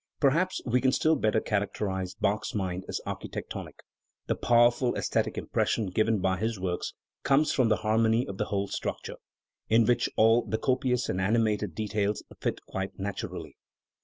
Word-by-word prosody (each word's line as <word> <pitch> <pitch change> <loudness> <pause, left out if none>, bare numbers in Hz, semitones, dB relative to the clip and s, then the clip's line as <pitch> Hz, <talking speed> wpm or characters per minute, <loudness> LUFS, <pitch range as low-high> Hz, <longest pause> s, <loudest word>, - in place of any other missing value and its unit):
Perhaps 165 +7 +2
we 125 +1 +2
can 130 - +3
still 160 +4 +3
better 110 -5 +2
characterise 100 -3 -2
Bach's 105 +2 0
mind 95 -2 -2
as - - -2
architectonic. - - -6 0.5
The - - +1
powerful 120 +1 +3
aesthetic - - -1
impression 105 -5 0
given 110 +3 +2
by 95 0 0
his 110 +1 -2
works 90 -1 -3 0.3
comes 140 +3 +3
from 125 -4 +2
the 110 - +4
harmony 110 +2 +3
of 100 -1 -7
the 105 - +1
whole 100 -1 -1
structure, - - -4 0.5
in 115 +1 +5
which 120 +1 +2
all 115 +2 +5
the 110 - -2
copious 125 0 0
and 95 - -1
animated 105 -3 +1
details 105 -1 -1 0.2
fit - - -3
quite 95 0 -5
naturally. 100 0 -5
110 Hz, 160 wpm, -28 LUFS, 100-120 Hz, 0.5 s, in